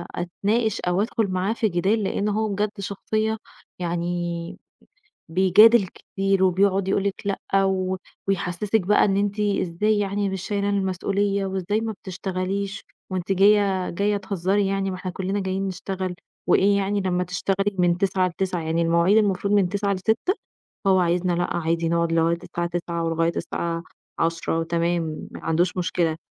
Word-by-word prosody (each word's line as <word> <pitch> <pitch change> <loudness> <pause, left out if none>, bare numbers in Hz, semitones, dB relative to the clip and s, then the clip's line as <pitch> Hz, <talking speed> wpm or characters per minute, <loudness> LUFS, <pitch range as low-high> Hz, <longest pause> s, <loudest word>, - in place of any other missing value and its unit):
أتناقش 205 +5 0
أو 180 +2 +1
ادخل 225 0 0
معاه 185 +3 0
في 225 -2 0
جِدال 195 +5 +1
لإن 200 +1 -1
هو 215 +1 0
بجد 205 +1 -1
شخصية 215 +3 -1 0.4
يعني 175 0 -3 0.7
بيجادل 190 +5 +6
كتير 195 +1 -1
وبيقعُد 190 +1 +2
يقول 195 0 +1
لِك 200 - 0
لأ 195 0 0
و 190 -1 0 0.3
ويحسسك 195 +3 0
بقى 205 +3 +3
إن 195 -1 +2
أنتِ 205 +1 0
إزاي 205 +1 +1
يعني 200 0 0
مش 190 -1 -4
شايله 200 0 -1
المسؤولية، 200 +1 0
وإزاي 190 +3 -1
ما 225 -1 -2
بتشتغليش 190 +1 -3 0.3
وأنتِ 185 0 -1
جايّة 195 -1 +3
جايّة 205 +3 0
تهزّري 195 0 0
يعني 195 0 -1
ما 185 - -4
إحنا 185 0 -5
كلّنا 190 +3 -2
جايين 190 0 -2
نشتغل 185 0 -4 0.3
وإيه 200 +1 +4
يعني 200 +1 0
لمّا 180 -1 0
تشتغلي 195 +3 -1
من 175 -1 +3
09:00 190 -2 +1
ل21:00 180 0 -2
يعني 160 +1 0
المواعيد 170 +4 +3
المفروض 200 -1 +1
من 195 -3 +4
09:00 200 +1 0
ل18:00، 220 - 0 0.5
فهو 190 -1 +4
عايزنا 175 +1 +1
لأ 175 +1 -1
عادي 165 0 0
نقعُد 170 0 +1
لغاية 165 +1 +2
الساعة 170 0 -3
21:00 170 -1 -3
ولغاية 165 0 +1
الساعة 165 0 -3 0.4
22:00 165 0 0
تمام 170 -1 -1
ما - - -9
عندوش 175 +3 +1
مشكلة، 170 -2 0
190 Hz, 155 wpm, -24 LUFS, 175-200 Hz, 0.7 s, بيجادل